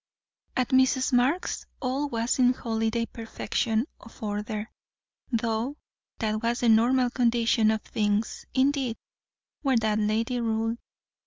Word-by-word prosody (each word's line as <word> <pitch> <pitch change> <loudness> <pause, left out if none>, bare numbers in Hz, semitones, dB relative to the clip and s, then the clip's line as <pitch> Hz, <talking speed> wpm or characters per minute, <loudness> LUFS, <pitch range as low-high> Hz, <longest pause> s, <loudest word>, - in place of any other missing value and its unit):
At 255 -2 +1
Mrs. 260 0 +3
Marx's 260 +9 +1
all 275 +2 -1
was 230 +1 -1
in 250 0 +5
holiday 225 -1 -1
perfection 225 0 -2
of 225 - -14
order; 210 +1 -3 0.6
though 230 +4 -1 0.4
that 215 -1 -1
was 235 +1 0
the 240 - +3
normal 245 +3 +4
condition 235 -3 +3
of 220 -1 0
things, 210 0 -1
indeed, 265 -3 +1 0.6
where 270 -4 +2
that 215 -1 +1
lady 225 +4 0
ruled. 225 0 -1
230 Hz, 125 wpm, -27 LUFS, 220-255 Hz, 0.6 s, in